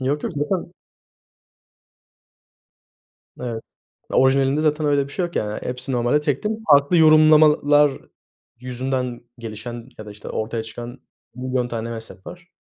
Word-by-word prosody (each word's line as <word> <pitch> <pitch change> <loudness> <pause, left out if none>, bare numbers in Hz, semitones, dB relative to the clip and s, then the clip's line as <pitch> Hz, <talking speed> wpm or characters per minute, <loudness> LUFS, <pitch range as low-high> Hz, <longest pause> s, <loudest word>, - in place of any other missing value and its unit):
Yok, 140 +3 -1
yok, - - -3
zaten 170 +4 -2 2.7
Evet, 115 -3 -5 0.5
orijinalinde 135 +2 +3
zaten 155 0 +1
öyle 145 -1 +2
bir 140 - -12
şey 180 - -1
yok 175 - -6
yani. 105 0 -2
Hepsi 125 +2 -3
normalde 120 +4 +2
tek 145 -3 -1
tek 215 - 0 0.2
farklı 145 +4 +5
yorumlamalar 155 -2 +6 0.7
yüzünden 125 0 -3 0.2
gelişen 115 +1 -7
ya 110 - -9
da, 105 - -8
işte, 105 0 -10
ortaya 110 +1 -3
çıkan 120 +2 -9 0.3
milyon 125 0 -2
tane 115 -1 -4
mezhep 110 -5 -9
var. 175 0 -11
130 Hz, 135 wpm, -22 LUFS, 120-150 Hz, 2.7 s, yorumlamalar